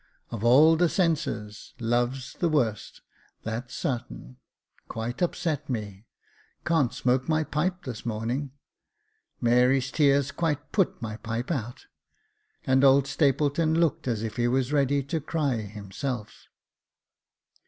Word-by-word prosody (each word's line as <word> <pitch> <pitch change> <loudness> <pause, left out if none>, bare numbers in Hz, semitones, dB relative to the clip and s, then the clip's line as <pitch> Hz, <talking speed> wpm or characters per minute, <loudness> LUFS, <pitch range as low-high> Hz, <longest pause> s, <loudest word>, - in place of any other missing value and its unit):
Of 115 -2 -5
all 150 +7 +6
the 175 0 +3
senses 150 - -2
love's 120 +2 -1
the 170 - 0
worst, 120 -9 -1 0.4
that's 120 +3 -5
sartain 65 - -4 0.2
— - - -59
quite 115 +5 -5
upset 155 -4 -1
me, 105 -3 -5 0.6
can't 155 -7 +2
smoke 130 0 0
my 155 0 +2
pipe 180 +5 -2
this 120 -4 -6
morning 120 +5 -2 0.5
— - - -46
Mary's 125 +2 +3
tears 140 -2 +3
quite 150 -4 -2
put 195 -5 +1
my 110 -1 -4
pipe 115 +5 -4
out 120 -6 -4 0.3
" - - -45
— - - -38
and 130 +1 +3
old 135 0 +6
Stapleton 145 +3 +1
looked 165 -5 +1
as 115 -3 -1
if 110 -1 -5
he 120 0 +2
was 130 +2 0
ready 140 -1 +2
to 160 +4 -3
cry 145 -4 -1
himself. 105 +3 -6
130 Hz, 140 wpm, -27 LUFS, 115-150 Hz, 0.6 s, all